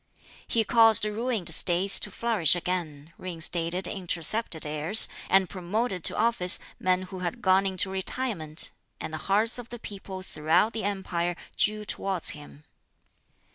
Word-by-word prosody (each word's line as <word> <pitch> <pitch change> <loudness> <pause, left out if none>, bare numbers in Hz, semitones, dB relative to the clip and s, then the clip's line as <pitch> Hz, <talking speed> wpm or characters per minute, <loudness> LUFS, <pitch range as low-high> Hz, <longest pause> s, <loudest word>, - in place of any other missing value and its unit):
He 230 - 0
caused 225 -1 +5
ruined 210 -5 -3
States 180 +4 +4
to - - -3
flourish 205 -6 +1
again, 165 -4 -5
reinstated 175 0 0
intercepted 180 -1 +1
heirs, 155 +8 +3 0.2
and 190 -1 +3
promoted 185 +1 -4
to - - +2
office 220 -5 +3 0.2
men 185 0 0
who 185 0 -9
had 180 +7 -5
gone 190 -1 +2
into 190 0 -1
retirement; 190 -5 -1 0.3
and 155 - -7
the - - -4
hearts 220 +5 +2
of 240 0 -10
the 240 - -8
people 195 -3 -9
throughout 170 +6 0
the 220 -3 -5
empire 175 -3 -3 0.2
drew 215 0 -1
towards 190 -3 +2
him. 150 0 -13
185 Hz, 140 wpm, -26 LUFS, 170-215 Hz, 0.3 s, caused